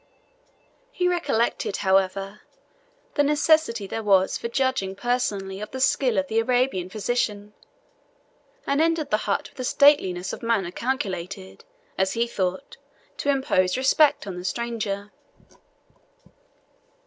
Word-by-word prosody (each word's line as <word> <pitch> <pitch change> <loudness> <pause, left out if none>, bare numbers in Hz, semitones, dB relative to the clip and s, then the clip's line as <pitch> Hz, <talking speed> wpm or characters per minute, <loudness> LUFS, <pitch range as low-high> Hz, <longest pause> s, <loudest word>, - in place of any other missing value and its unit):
He 360 -6 0
recollected, 240 - 0
however, 195 +1 +1 0.7
the 290 - +2
necessity 295 -6 +2
there 225 +3 -4
was 195 -3 +3
for - - -3
judging 260 -7 -1
personally 200 -5 -2
of 210 - -6
the 260 - -6
skill 260 -3 +2
of 190 - +2
the 220 +3 +1
Arabian 245 -6 0
physician, 210 -1 -2 1.1
and 280 +2 +1
entered 325 -2 0
the 215 - +4
hut 200 - -1
with - - -21
a - - -2
stateliness 245 -11 +3
of - - -7
manner 225 -6 0
calculated, 195 - -4 0.3
as 190 0 +1
he 230 +1 +1
thought, 190 +2 -3 0.4
to 285 - -2
impose 250 -9 +2
respect 275 +1 +3
on 190 -3 -6
the 180 - -6
stranger. 215 -2 -3
225 Hz, 125 wpm, -24 LUFS, 195-265 Hz, 1.1 s, the